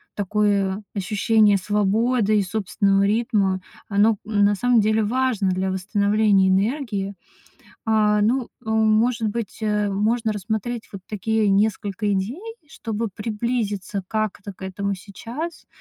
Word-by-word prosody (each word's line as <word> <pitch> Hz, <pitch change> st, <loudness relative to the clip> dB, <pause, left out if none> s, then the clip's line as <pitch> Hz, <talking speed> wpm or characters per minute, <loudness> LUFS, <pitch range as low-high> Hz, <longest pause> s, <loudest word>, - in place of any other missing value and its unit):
такое 205 Hz, -1 st, 0 dB
ощущение 210 Hz, +1 st, +3 dB
свободы 210 Hz, +3 st, +1 dB
и -, -, +3 dB
собственного 195 Hz, 0 st, +1 dB
ритма, 200 Hz, -3 st, +1 dB, 0.3 s
оно, 210 Hz, +1 st, +3 dB
м, 210 Hz, -1 st, +1 dB
на 205 Hz, 0 st, +3 dB
самом 240 Hz, +1 st, +3 dB
деле 215 Hz, +1 st, +2 dB
важно 235 Hz, -3 st, +1 dB
для 185 Hz, +1 st, -1 dB
восстановления 200 Hz, 0 st, +2 dB
энергии. 200 Hz, 0 st, 0 dB, 0.7 s
А, 210 Hz, -1 st, +3 dB
ну, 245 Hz, +5 st, +2 dB, 0.2 s
э, 220 Hz, -, -4 dB
может 220 Hz, +1 st, +2 dB
быть, 225 Hz, -1 st, -4 dB
э, 210 Hz, -1 st, 0 dB
можно 220 Hz, +3 st, 0 dB
рассмотреть 220 Hz, +3 st, -4 dB
вот 195 Hz, -2 st, -8 dB
такие 215 Hz, 0 st, 0 dB
несколько 205 Hz, 0 st, 0 dB
идей, 205 Hz, -, -2 dB, 0.3 s
чтобы 230 Hz, -7 st, -4 dB
приблизиться 210 Hz, -3 st, -2 dB
как-то 210 Hz, -2 st, -3 dB
к 190 Hz, -, -15 dB
этому 200 Hz, +1 st, -3 dB
сейчас. 230 Hz, -, -7 dB
210 Hz, 125 wpm, -22 LUFS, 200-225 Hz, 0.7 s, ощущение